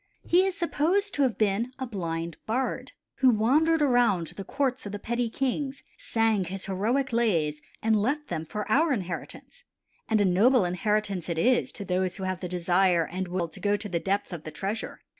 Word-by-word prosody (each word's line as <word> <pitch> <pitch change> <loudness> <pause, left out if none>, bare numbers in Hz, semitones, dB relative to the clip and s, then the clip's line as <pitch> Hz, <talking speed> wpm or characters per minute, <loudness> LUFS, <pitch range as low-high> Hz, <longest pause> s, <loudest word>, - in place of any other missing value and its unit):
He 365 +3 +4
is 385 0 -3
supposed 365 +4 +1
to 285 - 0
have 255 -5 +2
been 215 +4 0
a 260 - -3
blind 170 -7 -4
bard, 250 +4 -2 0.2
who 260 - +5
wandered 295 +8 +3
around 245 -10 +3
to - - -10
the 195 - -7
courts 265 -1 -1
of - - -6
the - - -2
petty 235 +3 -2
kings, 270 +2 -2
sang 225 -4 +1
his 190 +2 -5
heroic 230 +8 0
lays 165 -11 +1 0.2
and 220 0 +3
left 275 +9 0
them 160 -3 -3
for 210 +6 -5
our 310 +6 +4
inheritance, 190 - -6 0.5
and 220 -1 +3
a 205 - +4
noble 210 +5 +4
inheritance 195 0 -1
it 170 - -2
is 245 +8 +2
to 200 - -5
those 185 0 -1
who 190 - -6
have 185 -1 -2
the 180 - -5
desire 180 -1 +2
and 185 +3 -4
will 175 -1 -2
to - - -10
go 205 0 +1
to 205 - -4
the 175 -4 -1
depth 195 +1 -1
of 170 - -5
the 155 - -7
treasure. 195 +8 -4
210 Hz, 200 wpm, -27 LUFS, 185-255 Hz, 0.5 s, who